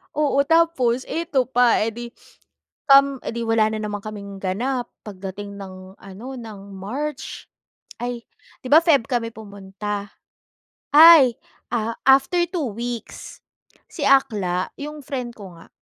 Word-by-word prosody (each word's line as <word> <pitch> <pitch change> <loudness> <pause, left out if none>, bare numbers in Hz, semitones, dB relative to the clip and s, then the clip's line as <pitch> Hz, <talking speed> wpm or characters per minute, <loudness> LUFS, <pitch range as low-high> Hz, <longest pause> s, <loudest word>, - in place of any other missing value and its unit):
Oo. 280 -2 +2
Tapos 325 -7 +2
eto 320 -6 -1
pa, 245 -2 +3
eh - - -1
'di, 240 +2 -8 0.9
um 275 -1 +6
eh - - -4
di, 235 - -3
wala 220 -1 +2
na 220 - -3
naman 205 -1 -5
kaming 200 -2 -8
ganap, 240 +6 -2
pagdating 200 0 -8
ng 185 -1 -11
ano, 195 +5 -11
ng 225 -5 -9 0.2
March 260 +9 -6 0.6
ay 245 -1 -4 0.4
'di - - -6
ba, 310 - +9
Feb 280 -9 +3
kami 235 -3 -2
pumunta. 205 -1 -7 0.8
Ay! 305 -6 +8 0.3
Ah, 230 -1 -1 0.2
after 275 +6 +4
two 310 - -3
weeks, 235 +1 -7 0.5
si - - -9
Akla 200 -10 +2
yung 300 +1 -7
friend 250 -3 -5
ko 195 -4 -11
nga, 165 - -16
235 Hz, 135 wpm, -22 LUFS, 205-275 Hz, 0.9 s, ba